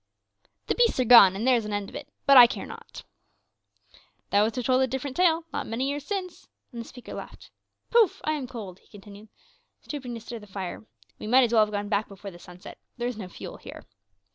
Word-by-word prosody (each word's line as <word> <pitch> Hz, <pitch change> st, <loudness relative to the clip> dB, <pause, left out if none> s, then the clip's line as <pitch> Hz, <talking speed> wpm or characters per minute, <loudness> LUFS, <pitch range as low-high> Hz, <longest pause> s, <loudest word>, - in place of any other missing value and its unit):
"The -, -, 0 dB
beasts 475 Hz, -, +2 dB
are 255 Hz, -, +2 dB
gone, 210 Hz, -6 st, +8 dB
and 210 Hz, +4 st, -3 dB
there 255 Hz, -1 st, +4 dB
is 230 Hz, -, -2 dB
an 210 Hz, -, -5 dB
end 205 Hz, -1 st, -3 dB
of -, -, -12 dB
it; 290 Hz, -, -7 dB, 0.2 s
but 275 Hz, -, +6 dB
I 245 Hz, -2 st, +11 dB
care -, -, -6 dB
not." -, -, -11 dB, 1.3 s
"Thou 200 Hz, -, +4 dB
wouldst 220 Hz, +2 st, 0 dB
have 250 Hz, -2 st, -3 dB
told 255 Hz, 0 st, +3 dB
a 260 Hz, -, +2 dB
different 265 Hz, +1 st, -5 dB
tale 335 Hz, -2 st, +3 dB
not -, -, -3 dB
many 235 Hz, +4 st, -2 dB
years 285 Hz, +1 st, -4 dB
since." 375 Hz, -3 st, -5 dB, 0.2 s
And 235 Hz, -2 st, -7 dB
the -, -, -9 dB
speaker 250 Hz, -, -11 dB
laughed. -, -, -10 dB, 0.4 s
"Poof! 460 Hz, -6 st, +4 dB
I 310 Hz, -, 0 dB
am 290 Hz, -4 st, -3 dB
cold," 210 Hz, -7 st, -9 dB
he -, -, -28 dB
continued, 205 Hz, +1 st, -14 dB, 0.5 s
stooping 255 Hz, -5 st, -6 dB
to -, -, -6 dB
stir 230 Hz, +1 st, -8 dB
the 210 Hz, -, -14 dB
fire. 190 Hz, -, -7 dB, 0.3 s
"We -, -, -7 dB
might 255 Hz, +4 st, +5 dB
as 240 Hz, -1 st, 0 dB
well 220 Hz, -2 st, +6 dB
have 210 Hz, -, -4 dB
gone 205 Hz, 0 st, -3 dB
back 205 Hz, +1 st, 0 dB
before 200 Hz, 0 st, -10 dB
the 175 Hz, -, -14 dB
sun 180 Hz, +1 st, -14 dB
set; -, -, -12 dB, 0.2 s
there 240 Hz, 0 st, -2 dB
is 245 Hz, -, -4 dB
no 190 Hz, -, -6 dB
fuel 180 Hz, -, -9 dB
here." -, -, -12 dB
235 Hz, 240 wpm, -26 LUFS, 205-265 Hz, 1.3 s, I